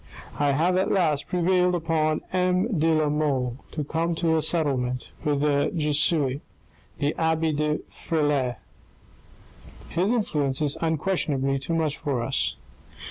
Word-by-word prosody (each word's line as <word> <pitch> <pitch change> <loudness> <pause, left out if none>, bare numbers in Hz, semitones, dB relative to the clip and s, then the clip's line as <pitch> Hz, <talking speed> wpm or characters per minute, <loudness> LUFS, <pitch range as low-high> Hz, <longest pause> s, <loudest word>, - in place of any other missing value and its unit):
" - - -18
I 145 -1 +2
have 175 +6 +2
at 190 - +1
last 155 -7 +1
prevailed 180 0 +2
upon 160 -2 0
M. 185 +2 +1
de 160 - +2
la 155 -1 +2
Mole 140 -5 0
to 150 - -4
come 165 +3 -1
to 165 -1 +1
a 160 - +2
settlement 135 -6 0
with 145 -2 0
that 145 +2 +1
Jesuit, 150 -2 +1 0.6
the 145 0 0
abbe 160 -1 +1
de 150 0 -1
Frilair. 145 -6 0 1.3
His 180 +5 0
influence 150 - 0
is 150 -2 +1
un 160 -1 +1
questionably 140 -6 0
too 165 +5 -3
much 155 -3 0
for 135 -5 -2
us. 135 +3 0
155 Hz, 145 wpm, -25 LUFS, 145-165 Hz, 1.3 s, I